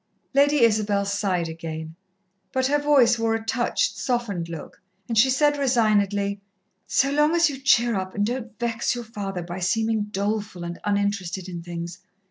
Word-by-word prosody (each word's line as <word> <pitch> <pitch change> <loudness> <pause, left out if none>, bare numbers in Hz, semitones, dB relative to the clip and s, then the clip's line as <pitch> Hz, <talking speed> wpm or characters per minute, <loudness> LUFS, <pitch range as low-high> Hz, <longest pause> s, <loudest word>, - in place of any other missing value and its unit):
Lady 285 -1 +4
Isabel 210 -3 +2
sighed 195 -4 0
again, 160 -1 -6 0.6
but 260 -1 0
her 290 +2 +2
face 265 -5 +4
wore 225 0 +1
a 225 0 -5
touched, 245 - 0
softened 210 -9 -2
look, 165 -2 -9 0.3
and 230 - -2
she 230 +5 +5
said 290 +2 +2
resignedly, 205 -6 +1 0.5
"So 275 +1 +2
long 300 +3 +3
as 335 -3 +4
you 270 - -7
cheer 240 -3 +3
up, 190 -2 -3
and 205 - +1
don't 235 -2 -4
vex 235 0 -1
your 240 - -5
father 195 -5 -5
by 175 +2 -6
seeming 220 +3 0
doleful 205 -2 -3
and 170 0 -6
uninterested 200 -3 -1
in 175 -2 -6
things.... 170 0 -6
215 Hz, 165 wpm, -24 LUFS, 190-245 Hz, 0.6 s, she